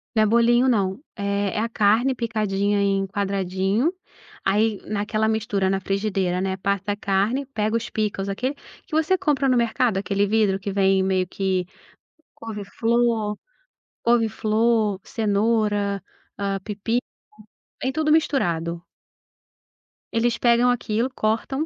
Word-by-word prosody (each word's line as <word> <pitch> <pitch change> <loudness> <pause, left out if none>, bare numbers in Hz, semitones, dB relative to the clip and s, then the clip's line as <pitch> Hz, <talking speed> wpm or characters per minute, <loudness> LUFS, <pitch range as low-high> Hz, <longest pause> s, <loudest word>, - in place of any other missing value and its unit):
Não 215 - +5
é - - +4
bolinho, 235 +3 +4
não. 200 -1 +1
É 200 -1 -1
é - - 0
a 230 - 0
carne 225 +5 +3
picadinha 205 -3 0
em 195 -1 +1
quadradinho, 195 - 0 0.5
aí 210 +2 +1
naquela 215 +1 -1
mistura 210 -3 0
na 195 0 +1
frigideira, 195 -2 -1
né, 190 0 -1
passa 200 +1 -1
a - - -1
carne, 205 +7 0
pega 215 -4 -1
os 230 - -5
pickles 205 -2 -2
aquele 255 +8 -2 0.3
que 330 - -19
você 320 +4 +2
compra 280 -4 +1
no 250 - +3
mercado, 235 -2 +1
aquele 200 +1 0
vidro 210 -2 +2
que 200 +1 -4
vem 195 -1 +3
meio 185 -1 +1
que 190 -2 -1 0.7
couve-flor 225 0 -1 0.7
couve-flor, 220 -2 +2
cenoura, 205 -2 0 0.4
hã, 195 -1 -1
pepino, 225 +3 -1 0.8
vem 260 - 0
tudo 305 +1 0
misturado. 170 - +1 1.3
Eles 235 +1 +1
pegam 240 +1 +4
aquilo, 240 0 0
cortam 255 +5 -1
210 Hz, 130 wpm, -23 LUFS, 195-235 Hz, 1.3 s, Não